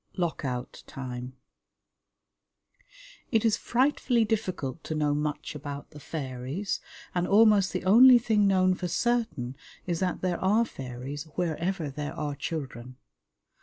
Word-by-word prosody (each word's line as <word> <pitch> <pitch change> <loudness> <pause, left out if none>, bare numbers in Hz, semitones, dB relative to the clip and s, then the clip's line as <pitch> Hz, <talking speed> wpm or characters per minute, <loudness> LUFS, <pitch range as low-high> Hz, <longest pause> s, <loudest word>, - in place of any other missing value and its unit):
Lock 170 -4 -1
Out 125 -2 -4
Time 125 -1 -6 2.0
It 225 -2 +2
is 220 - +4
frightfully 250 -2 +2
difficult 185 - -2
to 155 - -3
know 150 -1 +1
much 150 0 -2
about 145 -1 -7
the 150 - -11
fairies, 140 +5 -4 0.3
and 180 0 0
almost 205 -2 +5
the 185 - -3
only 245 +6 +9
thing 215 -3 +2
known 185 -1 +4
for 180 0 -3
certain 175 - -1 0.3
is 170 -2 -1
that 185 -1 -1
there 180 -1 -1
are 215 +5 +4
fairies 135 - -7
wherever 170 -1 -1
there 145 +1 -5
are 150 -1 -3
children. 130 -4 -6
165 Hz, 130 wpm, -28 LUFS, 140-200 Hz, 2.0 s, only